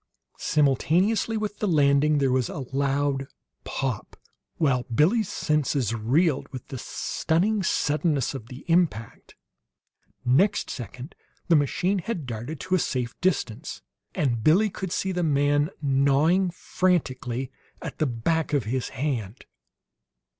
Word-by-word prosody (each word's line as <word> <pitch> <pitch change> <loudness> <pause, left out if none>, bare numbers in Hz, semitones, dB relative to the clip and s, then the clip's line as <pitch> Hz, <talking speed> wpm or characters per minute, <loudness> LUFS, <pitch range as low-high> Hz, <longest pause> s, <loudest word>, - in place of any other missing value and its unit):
Simultaneously 175 - +2
with 210 -1 -4
the 210 - 0
landing 150 -2 +4
there 135 -2 +2
was 130 -2 +1
a 135 - -5
loud 140 0 0 0.4
pop, 130 -5 -4 0.4
while 135 -6 +2
Billie's 165 - +2
senses 145 -6 0
reeled 135 +7 +1
with 130 -3 -8
the 135 - -5
stunning 195 - 0
suddenness 150 -5 +1
of 125 -5 -7
the 125 +3 -11
impact. 165 -11 0 0.9
Next 185 +12 +2
second 125 - -7 0.4
the 170 - +6
machine 175 +7 +1
had 180 -5 -4
darted 120 +5 -5
to 185 - -3
a 185 - +4
safe 125 -6 -2
distance, 130 -11 -1 0.3
and 120 -6 0
Billie 195 +7 +4
could 190 -1 -5
see 190 +1 -1
the 180 -1 -1
man 145 -1 +2
gnawing 140 +7 +3
frantically 135 -9 -1 0.3
at - - -7
the 155 - +2
back 150 +7 -1
of 140 -4 +2
his 125 +4 -2
hand. 125 -6 -3
145 Hz, 130 wpm, -25 LUFS, 130-175 Hz, 0.9 s, the